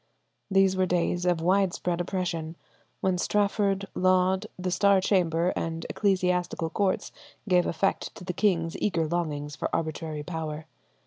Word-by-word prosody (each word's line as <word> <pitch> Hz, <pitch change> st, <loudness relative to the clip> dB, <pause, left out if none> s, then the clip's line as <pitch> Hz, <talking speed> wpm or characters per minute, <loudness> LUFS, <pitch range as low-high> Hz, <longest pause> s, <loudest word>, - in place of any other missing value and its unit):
These 195 Hz, -1 st, +4 dB
were 185 Hz, 0 st, +2 dB
days 175 Hz, 0 st, 0 dB
of 175 Hz, -2 st, +2 dB
widespread 180 Hz, -1 st, +1 dB
oppression, 175 Hz, -3 st, -3 dB, 0.5 s
when 185 Hz, -1 st, +1 dB
Strafford, 200 Hz, 0 st, +1 dB
Laud, 185 Hz, 0 st, +2 dB
the 185 Hz, 0 st, -2 dB
Star 200 Hz, +1 st, +4 dB
Chamber, 180 Hz, -2 st, +2 dB
and 165 Hz, 0 st, -3 dB
ecclesiastical 180 Hz, -4 st, 0 dB
courts 195 Hz, -2 st, 0 dB, 0.4 s
gave 180 Hz, -2 st, +3 dB
effect 195 Hz, +3 st, -1 dB
to -, -, -10 dB
the 180 Hz, 0 st, -3 dB
king's 170 Hz, -4 st, +1 dB
eager 165 Hz, -6 st, +1 dB
longings 150 Hz, -3 st, -2 dB
for -, -, -3 dB
arbitrary 155 Hz, -1 st, -3 dB
power. 155 Hz, -1 st, -5 dB
180 Hz, 135 wpm, -27 LUFS, 165-190 Hz, 0.5 s, These